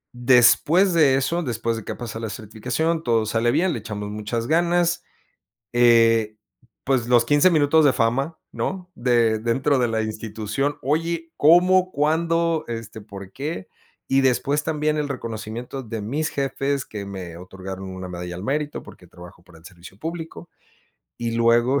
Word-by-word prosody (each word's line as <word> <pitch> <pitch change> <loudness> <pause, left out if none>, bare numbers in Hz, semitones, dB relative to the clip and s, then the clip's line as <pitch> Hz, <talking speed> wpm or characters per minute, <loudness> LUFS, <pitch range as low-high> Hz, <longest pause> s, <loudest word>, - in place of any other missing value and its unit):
Después 130 +9 +4
de 150 -5 +5
eso, 135 +6 0
después 115 -5 -2
de 110 - -6
que - - -5
ha - - -12
pasado 115 -1 -6
la - - -4
certificación, 120 - -2
todo 115 -6 +1
sale 115 +2 +1
bien, 165 +8 +2
le - - -3
echamos 105 -1 -6
muchas 105 +2 -3
ganas, 175 +3 +1 0.7
eh, 115 -2 +4 0.5
pues 130 -3 0
los 120 -1 +4
15 145 +7 +4
minutos 155 -2 +4
de 140 - +5
fama, 130 +8 0
¿no? 185 -1 -4
De 120 -3 +2
dentro 130 +5 +1
de 125 - +2
la 110 -1 -1
institución, 110 +5 -3
oye, 165 +4 -1
¿cómo, 180 +4 +5
cuándo, 165 +2 +1
este, 115 -2 -7
por 100 -2 -10
qué? 140 - -5 0.4
Y 135 0 +3
después 140 +3 +1
también 155 -1 0
el 150 -1 -1
reconocimiento 120 0 -6
de 110 -1 -5
mis 145 +9 -2
jefes, 140 0 -2
que 105 -2 -7
me 95 -4 -7
otorgaron 95 +1 -8
una 95 0 -7
medalla 90 0 -6
al 90 - -7
mérito 145 +5 -2
porque - - -15
trabajo 90 0 -14
para 85 -2 -17
el - - -25
servicio 90 +1 -13
público, 165 +5 -7 0.7
y 115 -1 -2
luego, 120 +4 +3
120 Hz, 160 wpm, -23 LUFS, 110-150 Hz, 0.7 s, de